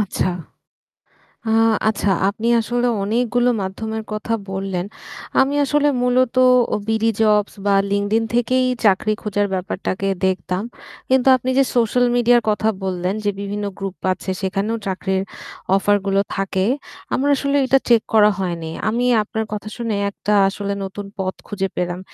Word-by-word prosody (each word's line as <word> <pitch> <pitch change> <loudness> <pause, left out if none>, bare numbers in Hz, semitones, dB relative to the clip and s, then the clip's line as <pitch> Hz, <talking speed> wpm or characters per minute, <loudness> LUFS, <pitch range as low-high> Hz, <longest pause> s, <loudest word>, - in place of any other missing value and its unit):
আচ্ছা। 205 -2 -1 1.2
আ - - +2 0.4
আচ্ছা 205 -1 -1 0.2
আপনি 215 +3 -3
আসলে 240 +2 0 0.2
অনেকগুলো 245 +3 +1
মাধ্যমের 220 +3 -4
কথা 215 +2 -3 0.2
বললেন। 190 -1 -3 0.6
আমি 275 +2 +1
আসলে 295 +1 +2
মূলত 250 0 +2 0.4
অ - - 0
বিডি 220 0 +2
জবস 210 -1 +3
বা 200 -1 +3 0.2
LinkedIn 205 +3 +1
থেকেই 255 +2 +2 0.2
চাকরি 205 +2 +3
খোঁজার 205 -1 0
ব্যাপারটাকে 190 +1 -3 0.2
দেখতাম। 185 +1 -1 0.5
কিন্তু 260 0 +3
আপনি 255 +1 -3
যে 275 - +6
সোশ্যাল 245 +1 +3
মিডিয়ার 240 0 +4
কথা 215 +1 +1
বললেন, 185 0 -1
যে 205 - +1
বিভিন্ন 205 +1 -3
গ্রুপ 195 -1 -5 0.2
আছে 190 - -5
সেখানেও 200 +4 -1
চাকরির 190 0 -1 0.5
অফার 205 +1 +3
গুলো 195 0 +2
থাকে। 195 -1 -1 0.5
আমার 280 +2 +1
আসলে 280 +1 -1
এটা 270 +1 +4
চেক 235 -2 +6
করা 210 -1 +6
হয়নি। 170 -3 -3 0.2
আমি 240 +3 0 0.2
আপনার 220 +1 -3
কথা 210 0 -5
শুনে 230 -3 -2
একটা 205 +1 -2 0.2
আসলে 200 0 -4
নতুন 195 +1 -6
পথ 190 -1 -2
খুঁজে 195 -2 -2
পেলাম। 175 0 -2
210 Hz, 145 wpm, -20 LUFS, 195-235 Hz, 1.2 s, যে